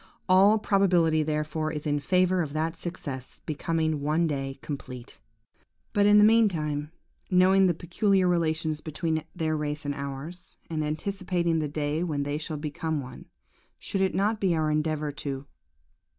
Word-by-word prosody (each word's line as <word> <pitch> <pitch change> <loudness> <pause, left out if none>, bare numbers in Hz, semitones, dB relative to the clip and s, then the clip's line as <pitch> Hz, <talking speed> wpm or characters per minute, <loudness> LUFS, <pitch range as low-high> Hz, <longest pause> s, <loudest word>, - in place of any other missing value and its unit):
All 195 +3 +6
probability 180 -6 +3
therefore 155 +1 -1
is 150 -1 -5
in 145 -1 +1
favour 180 +3 +2
of 150 -4 -4
that 160 +2 -1
success 145 -7 -6
becoming 160 0 -1
one 155 +4 +1
day 135 -3 -3
complete. 130 -4 -7 0.7
"But, 205 -2 +4
in 205 0 +7
the 210 - +7
meantime, 160 -10 +2 0.4
knowing 190 +1 +5
the 175 - +1
peculiar 185 +3 +1
relations 160 -3 0
between 160 0 -2
their 160 -2 0
race 150 0 -3
and 145 - -1
ours, 140 +5 -7
and 155 -1 -1
anticipating 170 +1 -1
the 150 -2 -2
day 150 +2 -1
when 150 -5 -1
they 145 +1 -2
shall 155 0 -5
become 155 +1 -3
one, 130 -2 -9 0.5
should 195 - -3
it 190 - +1
not 210 +3 +1
be 185 -4 +2
our 155 -1 +1
endeavour 150 -1 0
to 140 -1 -5
160 Hz, 155 wpm, -27 LUFS, 150-180 Hz, 0.7 s, in